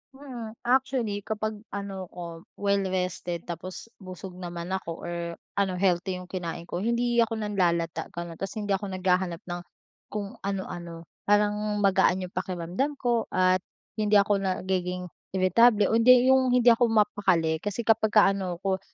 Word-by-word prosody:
Mm, 245 -5 -8
actually 250 -4 +1
kapag 215 +1 -3
ano 195 -2 -5
'ko, 170 -1 -9
well-rested 185 -3 -1
tapos 180 +6 -7
busog 185 -1 -9
naman 175 0 -6
ako 180 -3 -4
or 175 - -4 0.5
ano, 190 -2 +1
healthy 185 0 +1
'yung 180 0 -9
kinain 170 -2 -4
ko, 175 +1 -5
hindi 235 +3 +1
ako 230 -1 +2
nanlalata 170 -6 0
ganun, 170 -1 -6
ta's 195 - -4
hindi 205 -2 -3
ako 195 +1 0
naghahanap 185 -2 0
ng 175 0 -5 0.5
kung 205 -1 -6
ano-ano. 175 -4 -5 0.2
Parang 210 0 +2
magaan 190 -1 +3
'yung 180 - -7
pakiramdam 185 - -2
ko 240 -4 0
at 185 0 +3 0.4
hindi 210 0 +2
ako 200 0 +4
nagiging 185 -2 -2 0.2
iritable 205 +3 +4
o 225 - +4
hindi 255 +2 +7
'yung 260 -1 +4
hindi 245 -1 +6
ako 235 +1 +4
mapakali, 190 -7 +2
kasi 205 +6 -3
kapagka 215 -2 +4
ano 185 -2 -4
'ko 190 -1 0
195 Hz, 150 wpm, -27 LUFS, 180-215 Hz, 0.5 s, hindi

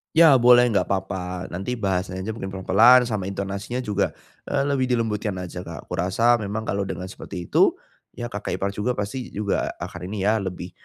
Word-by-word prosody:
Ya 160 -5 +7
boleh, 125 0 +6
enggak 105 - +1
papa. 95 -1 -3
Nanti 95 +8 -3
bahasanya 95 -2 -2
mungkin 110 -3 -5
pelan-pelan, 100 +6 +5
sama 110 -6 -2
intonasinya 100 +5 -4
juga, 105 -4 -1 0.3
eee, 140 -1 0
lebih 140 -2 +1
dilembutkan 110 -4 -1
aja, 90 0 -7
Kak. - - -7
Aku - - -3
rasa 115 +7 +3
memang 105 +1 -3
kalau 100 -2 -2
dengan 90 0 -5
seperti 90 -3 -8
itu, - - +4 0.4
ya 120 0 -5
kakak 105 -1 -4
ipar 100 - -1
juga 105 +5 -1
pasti 120 +5 -4
juga 100 -1 -1
akan 85 - -7
ini 100 +1 -4
ya, 105 +3 +3
lebih 90 -2 -5
100 Hz, 185 wpm, -24 LUFS, 95-120 Hz, 0.4 s, Ya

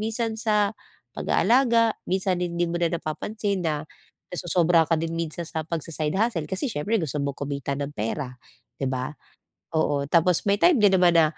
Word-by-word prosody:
minsan 225 +1 0
sa 210 -2 +2 0.4
pag-aalaga. 235 -3 +3
Minsan 185 -1 0
hindi 175 0 -1
mo 170 - -2
na 170 -1 +2
napapansin 195 +4 -3
na 150 -1 -1 0.5
nasosobrahan 170 -2 +3
ka 165 - +4
din 165 0 -3
minsan 165 +1 -3
sa 160 -1 -3
pagsa-side 160 0 -2
hustle, 185 -9 0
kasi 190 +9 0
siyempre 210 +10 0
gusto 150 -2 -3
mong 140 -1 -3
kumitan 140 -1 -3
ng 145 - -7
pera, 125 +5 -3 0.5
'di 135 - 0
ba? 130 +3 -3 0.6
Oo, 145 -3 +1
tapos 170 +1 +3
may 200 - +5
time 345 -7 +5
din 205 -2 +5
naman 180 -1 +5
na 165 - +7
170 Hz, 170 wpm, -25 LUFS, 150-205 Hz, 0.6 s, na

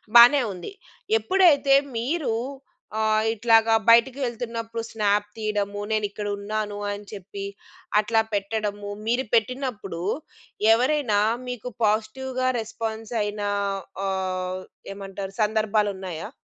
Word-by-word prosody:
బానే 245 +4 +9
ఉంది. 180 - -8 0.5
ఎప్పుడైతే 285 - +5 0.2
మీరు 270 +2 -1 0.6
ఆహ్, 215 0 +2
ఇట్లాగా 225 0 +4
బయటికి 235 +3 +6
వెళ్తున్నప్పుడు 230 -1 -4
స్నాప్ 205 -1 +1
తీయడము, 205 -2 -2
నేనిక్కడున్నాను 205 0 -2
అని 205 0 -6
చెప్పి 200 0 -7 0.6
అట్లా 220 +1 +3
పెట్టడము, 205 0 -2 0.2
మీరు 245 +3 +1
పెట్టినప్పుడు 230 -6 -1 0.7
ఎవరైనా 250 -3 +2 0.3
మీకు 250 -1 -5
పాజిటివ్‌గా 250 +5 0
రెస్పాన్స్ 225 0 -5
అయినా 205 0 -2 0.6
ఆహ్, 185 -1 -2 0.3
ఏమంటారు? 195 0 -7
సందర్భాలున్నాయా? 205 -5 -1
215 Hz, 90 wpm, -25 LUFS, 205-235 Hz, 0.7 s, బానే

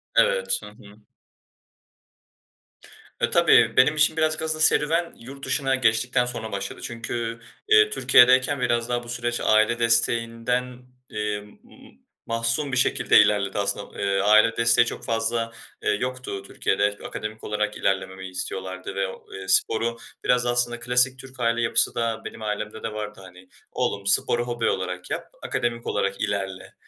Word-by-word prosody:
Evet. - - +2
Hı - - -8
hı. 105 -1 -17 2.2
Eee, - - +2
tabii - - +4
benim 150 +4 +5
için 155 +1 +2
birazcık 155 0 +1
aslında 155 0 -2
serüven 165 +3 +2
yurt 135 +3 -10
dışına 135 0 0
geçtikten 120 0 +2
sonra 120 -2 -6
başladı. 100 0 -5
Çünkü, 115 0 -4 0.3
eee, 430 -1 +6
Türkiye'deyken 130 - +4
biraz 120 -1 0
daha 120 0 -1
bu 120 - -12
süreç 120 0 -2
aile 110 +2 +3
desteğinden, 115 +2 0 0.2
eee, 105 -1 -2
m 105 0 -16
m - - -18 0.3
mahsun 115 +5 -1
bir 130 - -1
şekilde 130 - +4
ilerledi. 100 -1 +2
Aslında, 100 0 -3
eee, 100 -1 +1
aile 110 +2 +5
desteği 115 0 +4
çok - - -6
fazla, 115 0 -1 0.3
eee, - - +1
yoktu. 125 -2 -3
Türkiye'de 100 +1 -1
akademik 110 +1 -6
olarak 105 0 -2
ilerlememi 95 -1 -2
istiyorlardı 95 0 -5
ve 95 0 0
o 95 - -12
i 95 0 -8
sporu 115 +4 +2 0.3
biraz 125 0 +2
aslında 120 0 0
klasik 125 +2 +1
Türk 130 0 -13
aile 115 0 +1
yapısı 115 - +1
da 115 -1 -1
benim - - -8
ailemde 105 0 -4
de 110 -1 -4
vardı, 105 -1 -6
hani, 90 0 -15 0.2
"Oğlum 100 0 -2
sporu 120 +4 +1
hobi 120 -1 0
olarak 90 -1 -4
yap, - - -4 0.2
akademik 120 0 -2
olarak 100 -1 -1
ilerle." 100 -3 -3
115 Hz, 150 wpm, -24 LUFS, 105-125 Hz, 2.2 s, eee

